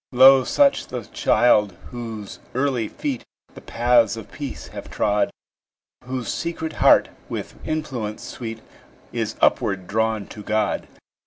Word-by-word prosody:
Lo, 130 +1 +8
such 280 - +3
the 125 -2 -5
child 105 -1 +3 0.2
whose 115 -4 -7 0.2
early 130 -4 +1
feet 135 0 -4 0.3
The - - -11
paths 120 -2 +3
of 110 - -9
peace 145 -3 -6
have - - -8
trod; 105 -1 +1 0.8
Whose 125 -3 -4
secret 165 -2 -3
heart, - - +5 0.2
with - - -5
influence 130 -9 -3
sweet, 115 -2 -6 0.5
Is - - -2
upward 95 -2 +2
drawn 110 +1 0
to 105 - -9
God. 105 0 0
120 Hz, 130 wpm, -23 LUFS, 110-130 Hz, 0.8 s, Lo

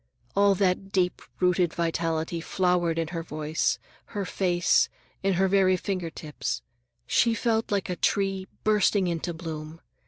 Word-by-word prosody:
All 200 0 +5
that 195 0 +1
deep 180 -2 +1 0.2
rooted 180 -2 +2
vitality 165 0 -1
flowered 175 -2 +1
in 165 -1 -1
her 170 -1 -3
voice, 155 -1 -1 0.4
her 200 - -1
face, 175 -2 +2 0.3
in 195 0 +2
her 190 +2 +3
very 185 -1 +4
finger 180 -2 -3
tips. 155 -2 -4 0.4
She 230 -1 +3
felt 225 -1 0
like 200 -2 0
a 180 - -2
tree 195 -1 0 0.2
bursting 205 -2 +3
into 170 0 -2
bloom. 160 -1 -7
180 Hz, 145 wpm, -27 LUFS, 165-195 Hz, 0.4 s, All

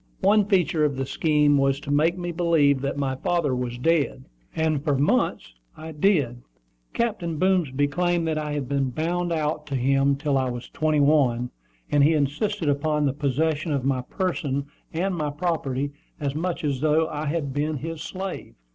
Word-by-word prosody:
One 205 +1 +4
feature 180 -6 +2
of 145 -2 +1
the 135 0 -2
scheme 150 0 +2
was 135 0 +2
to 145 - -5
make 160 +5 +2
me 175 -1 -3
believe 160 -5 +3
that 140 0 -2
my 135 -2 -1
father 150 -2 0
was 125 -1 -3
dead; 140 -1 +1 0.3
and 155 -3 0
for 145 -3 +1
months 135 - +1 0.2
I 160 +1 -8
did 150 -1 -13
believe 195 -7 +5
it. 120 -1 -9 0.6
Captain 175 -9 -1
Boomsby 155 -6 +2
claimed 175 +2 0
that 155 -1 0
I 150 -1 -3
had 145 -3 -3
been 135 -1 0
"bound 170 +6 -1
out" 150 -1 -1
to 140 - -3
him 135 +2 +2
till 140 -1 0
I 130 -1 0
was 120 0 -6
twenty 155 -1 +1
one; 130 -5 +2 0.4
and 145 -1 +4
he 155 +3 +5
insisted 155 +6 -1
upon 150 +1 +1
the 135 - +1
possession 155 +3 0
of 140 -3 -1
my 135 -2 +1
person 140 -2 -2 0.3
and 185 +4 -1
my 155 -4 -1
property 145 -3 -2 0.3
as 140 -2 -2
much 170 +3 -3
as 140 -3 -1
though 155 +1 +3
I 155 -1 -4
had 145 -3 -2
been 150 +2 -1
his 165 +2 -6
slave. 190 +2 -6
150 Hz, 190 wpm, -24 LUFS, 140-165 Hz, 0.6 s, believe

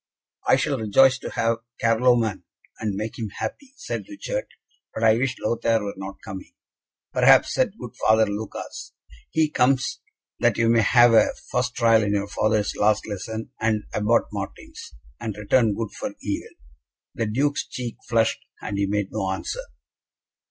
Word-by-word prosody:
"I - - +6
shall 140 -4 0
rejoice 130 +5 +4
to - - -6
have 115 0 0 0.2
Carloman, 115 -3 +2 0.4
and 105 -2 -2
make 110 +4 -5
him 110 -2 -3
happy," 275 -1 -6
said - - -5
Richard; - - -4 0.5
"but 110 - -3
I 110 -1 +6
wish 130 +2 0
Lothaire 115 -1 +1
were 100 - -4
not 95 0 -7
coming." 95 -3 -8 0.6
"Perhaps," - - +5
said - - 0
good - - -8
Father 110 0 +4
Lucas, 105 +1 -6 0.4
"he 160 -1 +2
comes 130 -3 +1 0.4
that - - +2
you 115 0 +3
may 115 0 +5
have 120 +2 +6
a 110 -1 +5 0.2
first 125 0 0
trial 115 -2 +4
in 105 -1 0
your 100 0 -1
father's 105 0 0
last 105 0 +2
lesson, 110 +2 -5
and 110 -1 +1
Abbot 105 +3 +3
Martin's, - - -7 0.3
and 110 -3 -5
return 105 +1 +2
good 115 -1 -3
for - - -6
evil." - - -4 0.6
The 115 - -2
Duke's 140 +6 0
cheek 125 -3 -6
flushed, 115 -1 +2 0.2
and 100 -2 -4
he 100 - +1
made 105 -1 -1
no 95 - -2
answer. 95 - -3
110 Hz, 160 wpm, -24 LUFS, 105-120 Hz, 0.6 s, I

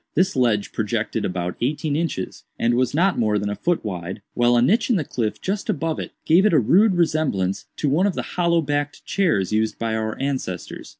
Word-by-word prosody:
This 185 +3 +2
ledge 115 -5 +1
projected - - -2
about 90 -1 -3
eighteen 145 +3 -1
inches, 160 - -3
and 120 +1 +1
was 125 +2 +1
not 185 +1 +2
more 105 -2 +2
than 105 0 -2
a - - -2
foot 175 -2 -1
wide, 95 0 -5
while 120 0 +3
a - - +4
niche 220 - +2
in 240 - +4
the 170 - +1
cliff 115 -6 -3
just 200 +2 -3
above 160 +1 -1
it - - -5
gave 170 +4 +5
it 215 - +3
a 155 - +6
rude 190 - +4
resemblance 155 - 0
to 150 - -1
one 160 +8 +3
of 195 - -2
the - - -2
hollow 170 -2 +2
backed 145 0 -2
chairs 110 - +1
used 110 0 0
by 115 -1 -2
our 110 0 -2
ancestors. 130 -10 -4
135 Hz, 215 wpm, -22 LUFS, 110-170 Hz, -, a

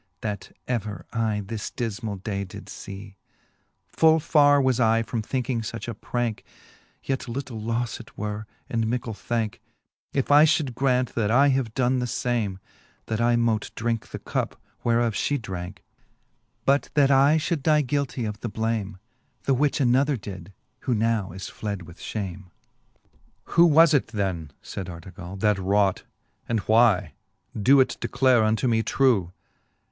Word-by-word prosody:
That 105 -2 -4 0.2
ever 110 -5 -3
I 110 -2 0
this 105 0 -5
difmall 110 -4 -4
day 100 -3 -2
did 90 - -10
fee: 100 0 -9 0.7
Full 160 0 +4
fai're 145 -1 +5
was 130 -2 +2
I 115 -1 +3
from 115 0 -3
thinking 125 +1 -2
fuch 110 0 -6
a 120 - -3
pranke; 120 +1 -3 0.6
Yet 135 -2 -2
little 120 -2 -5
lofle 115 +1 -2
it 115 0 -14
were, 105 0 -4 0.2
and 115 -1 -1
mickle 115 -1 -2
thanke, 110 +1 -3 0.5
If 135 0 -1
I 145 +2 +8
fhould 150 -5 +1
graunt, 125 -1 +1
that 110 -3 0
I 135 +5 +5
have 130 -5 0
doen 130 -1 +2
the 125 - -1
fame, 115 -6 -1 0.5
That 110 0 -2
I 120 0 +3
mote 115 -2 +1
drinke 115 0 -2
the - - -7
cup, - - -3 0.2
whereof 115 -1 +2
fhe 145 +7 0
dranke 95 -3 -6
j - - -26 0.8
But 140 +1 +2
that 140 -2 +5
I 140 +3 +5
fhould 160 0 -1
die 150 +1 +3
guiltie 135 -2 -1
of 105 0 -5
the 115 - -4
blame, 110 -3 -2 0.5
The 135 - +2
which 140 +2 +1
another 135 +2 +3
did, 95 -3 -9 0.3
who 125 - 0
now 110 -4 0
is 95 +2 -7
fled 100 -4 -5
with 85 +1 -14
fhame, 100 -3 -5
XVI. 90 - -29
Who 170 - +7
was 165 +1 +6
it 145 - +3
then, 95 -8 -2
fayd 95 - -6
Artegall^ 90 +2 -9
that 105 -2 +3
wrought? 100 0 +1 0.4
And 115 -1 +1
why? 110 - +3 0.4
Doe 130 +6 +5
it 130 - 0
declare 130 -4 +3
unto 110 +2 +1
me 115 -2 +3
trew. 110 -9 +2
115 Hz, 160 wpm, -25 LUFS, 105-130 Hz, 0.8 s, I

